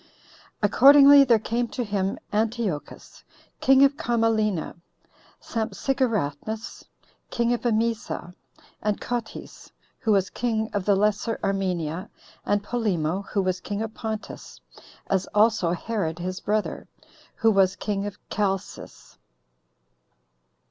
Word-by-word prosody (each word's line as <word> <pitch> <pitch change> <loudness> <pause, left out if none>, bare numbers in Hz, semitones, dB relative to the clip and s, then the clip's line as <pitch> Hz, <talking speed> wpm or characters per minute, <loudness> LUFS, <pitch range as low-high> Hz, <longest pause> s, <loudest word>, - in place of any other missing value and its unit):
Accordingly 280 +6 +8
there 240 -4 +4
came 235 +3 -2
to 245 - -4
him 200 -3 -2 0.2
Antiochus, 215 -8 -3 0.4
king 270 0 +5
of 275 +1 0
Commalena, 225 - 0 0.6
Sampsigeratnus, 220 - -2 0.5
king 235 0 0
of 240 - -2
Emesa, 225 -6 -1 0.5
and 210 -1 -1
Cotys, 240 -2 -6 0.3
who 225 - 0
was 195 -2 +1
king 220 -2 -2
of 200 -3 -2
the 205 - +4
Lesser 210 +3 0
Armenia, 180 -3 -2 0.4
and 205 0 +1
Polemo, 195 -7 -1
who 200 - +1
was 185 -1 -1
king 205 +3 -4
of 220 -1 -6
Pontus, 220 -1 -7 0.5
as 190 -1 -1
also 210 -4 +3
Herod 175 -3 -2
his 185 +2 -4
brother, 210 0 -2 0.5
who 225 - +3
was 190 -2 +3
king 205 0 -3
of 205 - -8
Chalcis. 195 -2 -4
215 Hz, 115 wpm, -25 LUFS, 195-230 Hz, 0.6 s, Accordingly